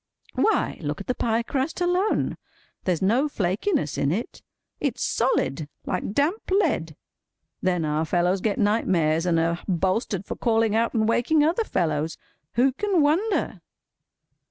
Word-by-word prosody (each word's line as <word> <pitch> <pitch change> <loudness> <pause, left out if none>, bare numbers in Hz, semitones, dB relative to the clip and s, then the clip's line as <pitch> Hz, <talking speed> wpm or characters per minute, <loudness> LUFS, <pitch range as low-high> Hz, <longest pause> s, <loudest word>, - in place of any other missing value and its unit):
Why, 440 -3 +1
look 150 -2 -3
at 195 - -7
the 250 - 0
pie 230 -1 0
crust 270 +7 -2
alone. 360 +4 +1 0.5
There's 180 -1 0
no 245 +10 +2
flakiness 195 - -1
in 140 - +1
it. 215 +8 -4 0.4
It's - - -1
solid—like 180 - -1
damp 310 - +1
lead. 320 - +1 0.7
Then 180 -3 +1
our 150 +1 0
fellows 180 +3 +1
get 210 -1 0
nightmares, 180 -6 +2
and 165 -2 +3
are 165 +1 0
bolstered 190 +2 0
for - - -5
calling 225 -2 +1
out 230 +2 +1
and 220 -1 +2
waking 295 +7 +3
other 335 +9 +2
fellows. 160 - -1 0.4
Who 255 +3 +3
can 375 +2 +1
wonder! 360 +9 0
215 Hz, 140 wpm, -25 LUFS, -, 0.7 s, and